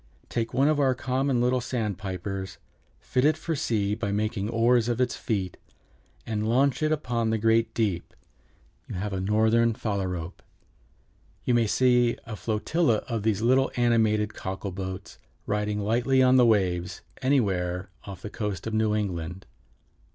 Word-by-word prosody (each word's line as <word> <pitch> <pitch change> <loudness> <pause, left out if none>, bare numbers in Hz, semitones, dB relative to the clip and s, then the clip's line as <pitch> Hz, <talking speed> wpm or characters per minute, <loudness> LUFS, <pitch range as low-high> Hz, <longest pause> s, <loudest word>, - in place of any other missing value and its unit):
Take 115 -1 -2
one 135 +2 +3
of 155 -1 +2
our 135 -2 +3
common 130 0 0
little 125 +1 +2
sandpipers, 95 -5 -4 0.4
fit 125 0 -1
it 155 +2 +4
for 165 - -3
sea 105 -8 0
by 105 -2 -2
making 105 0 -1
oars 120 +1 +3
of 120 0 -1
its 125 -1 +1
feet, 95 -5 -3 0.7
and 110 0 -2
launch 135 +4 +2
it 155 0 +1
upon 120 -7 0
the 110 - +1
great 115 +1 +2
deep, 100 -7 -1 0.7
you - - -6
have 100 +2 -3
a 95 - -2
Northern 110 +3 +3
Phalarope. 95 -5 -3 1.0
You 125 - +2
may 120 -2 +3
see 125 0 +3
a 115 - -6
flotilla 115 +4 0
of 115 -3 -2
these 110 0 0
little 130 +3 +3
animated 110 -3 +2
cockle 95 +1 -5
boats 95 +1 -7 0.3
riding 105 0 -1
lightly 120 +5 +2
on 130 0 +5
the 125 -2 +6
waves 90 -4 +1 0.2
anywhere 95 -8 0
off 95 -2 -9
the 105 - -6
coast 105 -6 -4
of 110 - -4
New 110 -1 +2
England." 90 -3 -3
110 Hz, 155 wpm, -26 LUFS, 100-120 Hz, 1.0 s, the